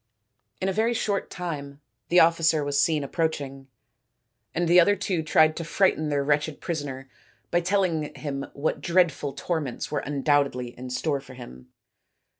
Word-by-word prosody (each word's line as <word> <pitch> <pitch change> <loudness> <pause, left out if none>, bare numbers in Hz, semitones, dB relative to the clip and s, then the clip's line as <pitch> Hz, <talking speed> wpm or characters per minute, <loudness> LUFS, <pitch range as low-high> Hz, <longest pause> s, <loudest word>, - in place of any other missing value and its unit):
In 190 - -1
a 195 - 0
very 225 +4 +1
short 205 -3 -1
time 145 -5 -6 0.3
the 180 - +6
officer 165 -2 +3
was 145 0 0
seen 155 -3 +2
approach 160 +3 -1
ing, 135 -1 -9 0.9
and 175 +1 +1
the 175 +2 +7
other 205 +4 +5
two 190 -3 -1
tried 155 0 +4
to 170 - -3
frighten 165 -2 +1
their 145 -1 +1
wretched 145 +1 0
prisoner 140 -5 -4 0.4
by 175 - +3
telling 175 -4 0
him 140 -2 -4
what 145 +2 -2
dreadful 170 -5 +1
torments 145 -2 -3
were 145 - 0
undoubtedly 140 -3 0
in 125 +1 -8
store 140 +2 -1
for 130 -1 -13
him. 65 - -11
155 Hz, 160 wpm, -26 LUFS, 140-170 Hz, 0.9 s, the